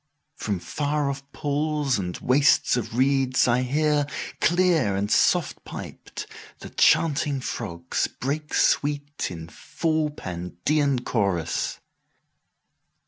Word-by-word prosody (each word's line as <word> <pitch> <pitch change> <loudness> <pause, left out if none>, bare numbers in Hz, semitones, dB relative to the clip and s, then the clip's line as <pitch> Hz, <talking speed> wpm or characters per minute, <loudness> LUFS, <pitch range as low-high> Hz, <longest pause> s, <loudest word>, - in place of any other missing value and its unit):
11From 100 -4 -2
far 145 - -1
off 140 0 -9
pools 145 -3 0
and 90 -2 -4
wastes 135 +1 +3
of 120 -1 -3
reeds 130 -1 +3
I 125 +1 +3
hear,12Clear 150 - +1
and 100 +1 -1
soft - - +2
piped, - - -8 0.3
the - - -10
chanting 145 -3 +3
frogs 85 -8 -3
break 150 +4 -4
sweet13In 145 - 0
full 155 -2 -1
Pandean 125 - -1
chorus. 95 -7 -1
140 Hz, 95 wpm, -25 LUFS, 105-150 Hz, 0.3 s, wastes